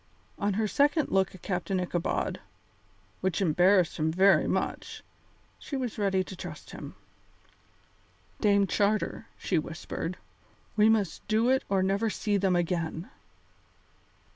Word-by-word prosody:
On 200 0 +1
her 215 +1 +1
second 290 +6 +2
look 190 -1 +2
at 185 - -15
Captain 185 0 -1
Ichabod, 175 -1 -1 0.8
which 185 -3 -1
embarrassed 180 0 +3
him 155 0 +1
very 190 +3 +4
much, - - -3 0.6
she 280 - -5
was 250 -5 -4
ready 195 -2 +2
to 190 - -9
trust - - -9
him. - - -9 1.4
"Dame 200 -2 +4
Charter," 210 +3 0
she 175 - 0
whispered, 165 +2 -5 0.6
"we 215 0 +5
must 210 -6 0
do 225 +3 +2
it 265 +1 +3
or 195 -1 +2
never 200 +4 +1
see 210 0 -1
them 190 -2 +2
again." 170 0 -2
195 Hz, 130 wpm, -28 LUFS, 180-210 Hz, 1.4 s, we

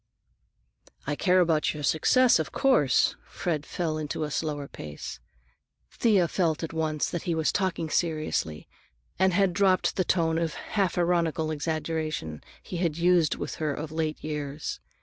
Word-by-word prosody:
"I 145 - -1
care 185 +3 +3
about 160 -3 +2
your 150 - -6
success, 235 - +4
of 160 - -2
course." 195 - +3
Fred 155 -4 -3
fell 160 -3 -2
into 155 +1 -3
a 150 - -3
slower 145 -2 -2
pace. 75 - -8 0.7
Thea 200 -7 +3
felt 165 -3 0
at 165 - -4
once 155 -2 0
that 170 - -2
he 170 - +1
was 160 -1 +1
talking 185 -4 -1
seriously 155 - -1 0.5
and 190 0 +4
had 190 0 +2
dropped 185 0 +2
the 185 - +3
tone 165 -2 +1
of 165 -2 -2
half 195 -5 -1
ironical 170 -2 +1
exaggeration 155 - -3 0.2
he 180 - -6
had 170 -3 0
used 170 -2 +3
with - - -5
her 150 -2 0
of 155 +1 -6
late 160 -1 -2
years. 150 - -4
160 Hz, 155 wpm, -27 LUFS, 150-175 Hz, 0.7 s, success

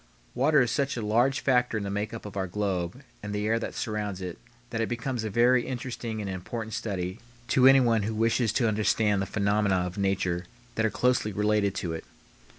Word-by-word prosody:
Water 140 +3 +4
is 120 - -1
such 140 -2 0
a 110 - -3
large 120 +6 +2
factor 125 -4 +2
in 105 - -3
the 100 - -3
make 105 +2 -2
up 115 -2 -8
of 105 - -8
our 95 -1 -1
globe 95 +4 -2 0.2
and 105 0 -5
the 105 0 -1
air 115 +1 +2
that - - -5
surrounds 105 -3 -3
it 90 -2 -6 0.3
that 115 - -1
it 115 - -1
becomes 120 0 -2
a 110 - -2
very 120 +4 +3
interesting 120 -3 -4
and 105 - -4
important 110 +4 -5
study 95 -2 -3 0.3
to 130 +1 +6
anyone 125 -5 +5
who 110 +2 -2
wishes 115 0 +2
to 120 -1 +2
understand 105 -1 +2
the 100 - -2
phenomena 100 -1 +1
of 90 +1 -2
nature 95 -2 0 0.3
that 110 0 +1
are - - -1
closely 125 -2 +1
related 105 -1 +1
to 85 -3 -3
it. 80 - -5
110 Hz, 210 wpm, -27 LUFS, 100-120 Hz, 0.3 s, to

